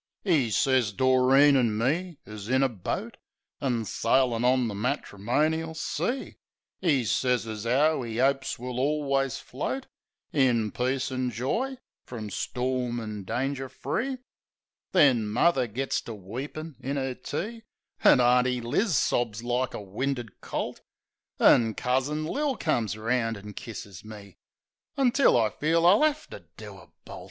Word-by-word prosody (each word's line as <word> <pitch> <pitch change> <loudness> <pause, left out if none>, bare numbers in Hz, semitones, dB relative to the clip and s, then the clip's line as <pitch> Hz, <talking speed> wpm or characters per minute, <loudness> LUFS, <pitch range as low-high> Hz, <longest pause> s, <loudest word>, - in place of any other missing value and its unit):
E' 150 - +3
sez 125 0 +2
Doreen 130 +4 +5
an' 115 -5 +2
me 160 +8 -1
is 105 0 -8
in 130 +1 +3
a - - +4
boat. 105 -7 -5 0.4
An' 120 -5 -1
sailin' 120 +1 +1
on 125 -1 +3
the 110 - -4
matrimonial 140 +8 -1
sea. 180 - -3 0.4
E' 150 -9 +2
sez 120 +6 +1
as 110 0 -5
'ow 145 +3 +3
'e 115 0 -4
opes 135 0 +1
we'll 125 +1 -6
alius 135 -2 0
float 260 - -4 0.5
In 120 -7 +2
peace 130 +2 -1
an' 130 -1 -1
joy, 225 - -2 0.3
from 110 -4 -7
storm 125 0 -2
an' 105 -3 -6
danger 135 +4 -2
free. 255 - -3 0.7
Then 135 - +4
muvver 130 +4 +2
gits 135 +5 -1
to 115 - -6
weepin' 135 - -7
in 140 +2 -3
'er 135 -1 -2
tea; 220 - -5 0.4
An' - - +7
Auntie 125 0 +3
Liz 145 - +1
sobs 115 -3 0
like 125 -1 -1
a - - -5
winded 120 +4 -4
colt; - - -4 0.6
An' 115 -2 +5
Cousin 135 +5 0
Lil 280 - -1
comes 110 - -1
'round 115 0 0
an' 105 +1 -10
kisses 100 -5 -8
me; 105 -3 -12 0.6
Until 270 - +4
I 110 -2 +2
feel 165 +6 +1
I'll 190 +5 +6
'ave 305 0 +2
to - - -9
do - - -10
a - - -17 0.2
bolt. - - -9
130 Hz, 145 wpm, -27 LUFS, 115-145 Hz, 0.7 s, An